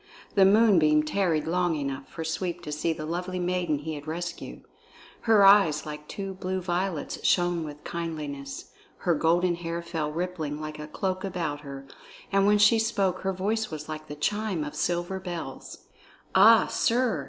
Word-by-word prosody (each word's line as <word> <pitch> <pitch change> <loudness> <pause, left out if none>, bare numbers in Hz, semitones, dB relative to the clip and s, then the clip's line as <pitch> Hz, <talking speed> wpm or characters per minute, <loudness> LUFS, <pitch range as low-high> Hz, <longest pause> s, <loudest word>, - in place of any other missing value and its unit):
The 195 -2 +6
moonbeam 190 -8 +5
tarried 160 -1 0
long 175 0 +1
enough 140 -2 -4
for 165 - -6
Sweep 175 +2 -3
to 150 - -6
see 150 +3 -1
the 155 -1 -4
lovely 180 +3 -3
maiden 180 -3 0
he 155 +2 -5
had 145 0 -8
rescued. 170 +2 -5 0.7
Her 210 -3 +7
eyes 195 -7 +6
like 150 0 -7
two 195 -1 -5
blue 185 0 -3
violets 180 -2 -3
shone 175 -2 +2
with 150 -1 -9
kindliness, 150 -5 -5 0.3
her 175 - +4
golden 170 +3 +2
hair 170 0 -4
fell 160 -3 -3
rippling 160 -3 -3
like 155 0 -6
a 150 - -6
cloak 185 +4 -3
about 170 -6 -3
her, 140 -1 -8 0.5
and 195 0 +3
when 210 0 +5
she 210 +2 +5
spoke 200 -5 0
her 190 - -1
voice 210 +4 -1
was 155 -1 -7
like 155 0 -7
the 145 - -7
chime 205 +2 -1
of 150 0 -6
silver 175 +4 -1
bells. 175 -3 -7 0.5
"Ah, 225 0 +7
sir!" 235 - +1
175 Hz, 170 wpm, -27 LUFS, 155-190 Hz, 0.7 s, Her